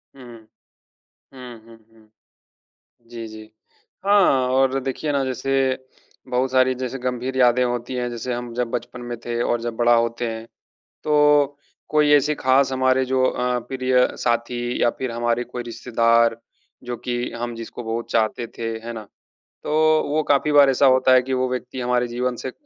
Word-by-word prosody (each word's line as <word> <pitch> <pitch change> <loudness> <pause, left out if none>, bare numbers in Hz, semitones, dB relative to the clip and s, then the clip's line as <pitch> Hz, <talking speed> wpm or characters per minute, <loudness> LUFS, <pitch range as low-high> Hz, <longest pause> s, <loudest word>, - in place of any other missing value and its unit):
हुँ। 130 - -13 1.1
हुँ, 125 -3 -10
हुँ, 115 0 -15 0.2
हुँ। 110 -1 -23 1.0
जी, 115 -1 -7
जी। 110 0 -11 0.6
हाँ, 185 -11 +4
और 135 +1 +2
देखिए 135 +3 -3
ना 140 -1 0
जैसे 130 +1 -3 0.8
बहुत 130 +1 0
सारी 130 0 +3
जैसे 130 +1 -4
गंभीर 125 +1 -3
यादें 125 0 +4
होती 120 +1 -3
हैं, 125 -1 -2
जैसे 120 +1 -4
हम 120 -1 -5
जब 125 -1 -1
बचपन 120 +1 -5
में 120 -1 -6
थे 120 0 -2
और 120 -1 0
जब 120 -1 -4
बड़ा 120 +1 +3
होते 115 +1 0
हैं। 110 0 -6 0.6
तो 150 -1 +3 0.3
कोई 150 -1 +3
ऐसी 145 +1 +3
ख़ास 130 0 +2
हमारे 130 0 +2
जो 130 0 0
अ, 125 -1 0
प्रिय 130 -1 +2
साथी 120 +1 -1
या 120 - +4
फिर 130 -2 -3
हमारे 120 +1 -1
कोई 125 0 -6
रिश्तेदार 115 -1 +1 0.5
जो 120 0 -4
कि 120 0 -3
हम 120 -1 -3
जिसको 115 +1 -8
बहुत 115 +1 -4
चाहते 115 +2 0
थे, 115 -1 -3
है 115 +1 -7
ना? 110 -2 -8 0.6
तो - - -4 0.4
वो 155 +2 +1
काफ़ी 145 +1 +2
बार 145 -1 +6
ऐसा 135 +1 +3
होता 130 0 +5
है 130 - +6
कि 130 +1 -4
वो 130 0 0
व्यक्ति 125 0 -5
हमारे 125 0 0
जीवन 125 +1 -2
से 130 - -5
अ - - -10
125 Hz, 175 wpm, -22 LUFS, 120-130 Hz, 1.1 s, बार